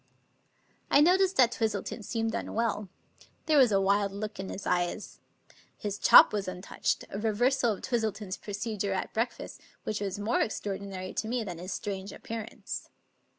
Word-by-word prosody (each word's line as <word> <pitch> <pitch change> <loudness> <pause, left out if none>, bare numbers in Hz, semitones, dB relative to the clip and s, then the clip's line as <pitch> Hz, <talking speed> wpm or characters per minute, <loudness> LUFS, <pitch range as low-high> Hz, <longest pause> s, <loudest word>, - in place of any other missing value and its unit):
I - - +6
noticed 370 +4 +4
that 245 -3 +6
Twistleton 220 -1 -2
seemed 225 +1 -2
unwell. 215 -4 -2 0.6
There 310 -2 +4
was 250 -4 +6
a 195 - +4
wild 200 +1 +2
look 210 +1 -5
in 190 - -4
his 195 - -6
eyes. 175 +3 -1 0.6
His 205 -1 -4
chop - - +8
was 205 -2 -1
untouched 185 0 -2
— - - -34
a 200 - -4
reversal 235 +2 +2
of 195 - -10
Twistleton's 215 -5 -2
procedure 205 -1 -3
at 190 - -3
breakfast, 230 +2 -3 0.2
which 215 -1 -3
was 195 -1 -2
more 210 +3 +1
extraordinary 195 -3 -4
to 220 - -2
me 240 0 -1
than 180 -5 -6
his 185 +2 -6
strange 195 +1 -4
appearance. 225 0 -6
210 Hz, 160 wpm, -29 LUFS, 195-230 Hz, 0.6 s, chop